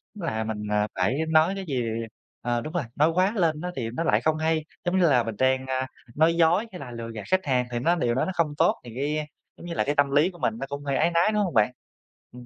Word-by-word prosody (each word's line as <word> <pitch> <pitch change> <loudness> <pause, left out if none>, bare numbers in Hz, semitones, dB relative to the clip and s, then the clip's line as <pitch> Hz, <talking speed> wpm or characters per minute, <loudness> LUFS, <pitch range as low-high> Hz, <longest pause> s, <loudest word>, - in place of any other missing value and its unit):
Là 155 - -2
mình, 110 -1 -3
ờ, 105 0 +2
phải 95 +9 +1
nói 160 +4 +4
cái 195 -1 -5
gì 130 -4 -1 0.6
ờ, 120 -1 -1
đúng 155 - -7
rồi, 175 -5 0
nói 150 +3 +4
quá 185 +4 +3
lên 165 -5 +1
á 180 0 -3
thì 115 -4 -3
nó 165 - -2
lại - - +2
không 155 0 +1
hay, 160 0 0 0.2
giống 175 +2 +1
như 170 -3 +5
là 125 -3 +4
mình 115 -1 -4
đang, 130 0 +2
ơ, 130 0 -1 0.3
nói 160 +2 +4
dối 170 +6 +3
hay 180 - -8
là 130 -5 -8
lừa 115 -1 -6
gạt 110 - -5
khách 185 -1 +2
hàng 125 -3 +1
thì 120 - -1
nó 170 +8 +2
điều 120 -8 0
đó - - +1
nó 190 - -2
không 155 -4 0
tốt, - - +4
thì 120 - -8
cái, 145 +4 -1
ơ, 155 - -1 0.3
giống - - -11
như 170 - -4
là, - - +1
cái 145 - 0
tâm 145 -1 +3
lý 145 +5 +4
của 175 - -15
mình 110 - +1
nó 135 - -3
cũng 140 0 -5
hơi 140 -1 0
áy 165 +4 +2
náy, 170 +5 +3
đúng 210 -1 +2
không 180 - -2
bạn? 110 +2 +3 0.6
Ừm. 125 0 -11
150 Hz, 290 wpm, -26 LUFS, 125-170 Hz, 0.6 s, như